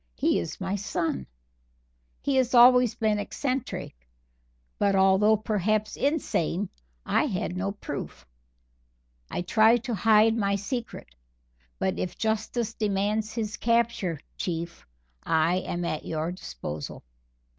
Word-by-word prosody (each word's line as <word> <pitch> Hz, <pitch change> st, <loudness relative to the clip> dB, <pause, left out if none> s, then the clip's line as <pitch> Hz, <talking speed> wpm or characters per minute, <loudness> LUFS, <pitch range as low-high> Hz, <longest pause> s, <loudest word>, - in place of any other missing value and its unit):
He -, -, +2 dB
is 85 Hz, -, -5 dB
my 190 Hz, +1 st, -2 dB
son. 165 Hz, -, -2 dB, 1.0 s
He 265 Hz, -2 st, +3 dB
always 250 Hz, -1 st, +7 dB
has -, -, -27 dB
been 215 Hz, -2 st, +1 dB
eccentric, 260 Hz, +4 st, -3 dB, 0.9 s
but 200 Hz, -1 st, +3 dB
although 195 Hz, +3 st, +5 dB
perhaps 215 Hz, 0 st, 0 dB
insane, 205 Hz, -, 0 dB, 0.4 s
I -, -, +2 dB
had 190 Hz, -5 st, -2 dB
no 195 Hz, +2 st, -2 dB
proof. 65 Hz, -, -7 dB, 1.0 s
I 175 Hz, -, -3 dB
tried 225 Hz, +5 st, +4 dB
to 250 Hz, -3 st, -3 dB
hide 220 Hz, +2 st, +4 dB
my 200 Hz, -3 st, +1 dB
secret, 215 Hz, -, -5 dB, 0.6 s
but -, -, -1 dB
if 180 Hz, -, -3 dB
Justice 220 Hz, +1 st, -1 dB
demands 210 Hz, +1 st, -1 dB
his 215 Hz, -3 st, -3 dB
capture, 230 Hz, -, +1 dB, 0.2 s
Chief, 170 Hz, -1 st, -4 dB, 0.3 s
I 165 Hz, +2 st, +2 dB
am 175 Hz, -1 st, -3 dB
at 155 Hz, -2 st, -2 dB
your 160 Hz, +1 st, -2 dB
disposal." 75 Hz, -, -7 dB
205 Hz, 120 wpm, -27 LUFS, 180-225 Hz, 1.0 s, always